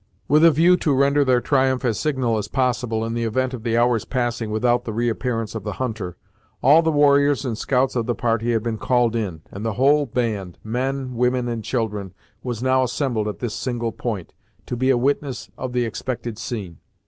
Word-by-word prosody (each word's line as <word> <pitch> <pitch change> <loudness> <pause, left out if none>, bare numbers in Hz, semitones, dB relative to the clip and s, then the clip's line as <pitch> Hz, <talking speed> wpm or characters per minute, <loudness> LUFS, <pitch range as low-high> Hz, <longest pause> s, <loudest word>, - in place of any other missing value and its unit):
With 150 +3 +4
a 165 - +9
view 170 +4 +4
to 150 -5 +1
render 140 +2 +3
their 130 -2 +3
triumph 130 -1 +1
as 115 -3 0
signal 130 -7 0
as 105 - -4
possible, 125 -3 0
in 115 - -3
the 115 0 -1
event 130 +3 0
of 125 - -5
the 115 0 0
hour's 120 -2 +2
passing 120 -3 -2
without 120 +3 +1
the 110 - -4
reappearance 115 0 -1
of 110 -3 -5
the - - -3
hunter, 110 -8 -4 0.5
all 150 +5 +7
the 160 -1 +1
warriors 145 -1 +4
and 120 -3 -2
scouts 130 +3 0
of 115 -2 -1
the 120 - 0
party 115 0 0
had 110 -2 0
been 115 -2 -3
called 120 -2 +2
in, 95 -8 -3
and 100 - -7
the 115 -1 -1
whole 140 +6 +3
band, 110 -7 -2
men, 130 +3 -2
women 125 +1 +1
and 115 -2 -3
children, 105 -6 -3 0.3
was 120 -2 -4
now 130 0 +3
assembled 120 -3 -1
at 105 - -4
this 120 -4 -4
single 120 -3 -2
point, 110 -7 -5 0.3
to - - -4
be 130 +2 +1
a 130 - +4
witness 135 0 -1
of 130 -1 -5
the 125 -1 0
expected 115 0 -4
scene. 100 -9 -5
120 Hz, 205 wpm, -22 LUFS, 115-130 Hz, 0.5 s, a